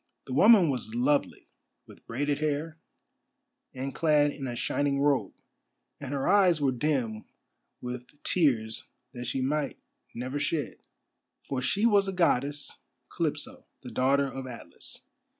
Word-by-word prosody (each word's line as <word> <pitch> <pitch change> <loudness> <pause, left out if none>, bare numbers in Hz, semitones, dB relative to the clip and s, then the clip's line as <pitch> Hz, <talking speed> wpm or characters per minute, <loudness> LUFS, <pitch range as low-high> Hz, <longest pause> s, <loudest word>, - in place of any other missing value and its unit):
The 130 - -6
woman 195 - +6
was 115 -4 -4
lovely, 140 +4 0 0.4
with - - -17
braided 145 +4 -1
hair, 155 +1 -2 0.9
and 135 +1 -5
clad 150 -2 +3
in 140 -2 -6
a 120 - -4
shining 140 +3 0
robe, 140 -8 +1 0.6
and 140 -2 -6
her 140 -1 -1
eyes 185 -4 +5
were 140 -2 +2
dim 125 -5 -1 0.6
with 125 0 -6 0.2
tears 120 -10 +1 0.3
that 120 -1 -6
she 130 +2 -1
might 145 +2 -1 0.4
never 130 +4 -3
shed: 145 - -2 0.7
for 135 -2 -3
she 160 - +1
was 205 -4 +4
a 195 - -2
Goddess, 145 -5 0 0.4
Calypso, - - -3 0.2
the - - -8
daughter 140 +2 +2
of 135 -1 -6
Atlas. 120 -2 -10
140 Hz, 135 wpm, -28 LUFS, 125-150 Hz, 0.9 s, woman